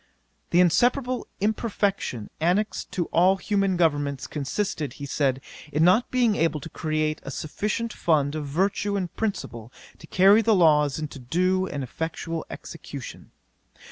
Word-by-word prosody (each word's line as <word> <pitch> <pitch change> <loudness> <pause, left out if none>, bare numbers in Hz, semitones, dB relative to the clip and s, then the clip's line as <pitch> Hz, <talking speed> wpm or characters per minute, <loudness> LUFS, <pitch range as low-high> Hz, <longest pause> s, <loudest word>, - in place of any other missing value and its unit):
'The 175 - +3
inseparable 245 - +2
imperfection 200 - -1
annexed 180 +7 0
to 175 - -1
all 185 +3 +5
human 195 -2 0
governments 145 -5 +1
consisted, 150 +2 -3
he 140 - -7
said, 135 -2 0 0.3
in 150 +2 +2
not 185 +8 +4
being 240 -4 +2
able 160 -3 +1
to 165 - -9
create 155 -1 -1
a - - -8
sufficient 210 - -3
fund 150 -4 +1
of 155 -2 -4
virtue 195 +6 0
and 180 -3 -3
principle 120 - -4 0.3
to 160 - -13
carry 195 +6 +5
the 225 -1 +3
laws 150 -5 +4
into 150 -2 -6
due 185 +8 +1
and 140 -5 -4
effectual 160 +4 -4
execution. 140 -5 -9
165 Hz, 140 wpm, -25 LUFS, 145-200 Hz, 0.3 s, all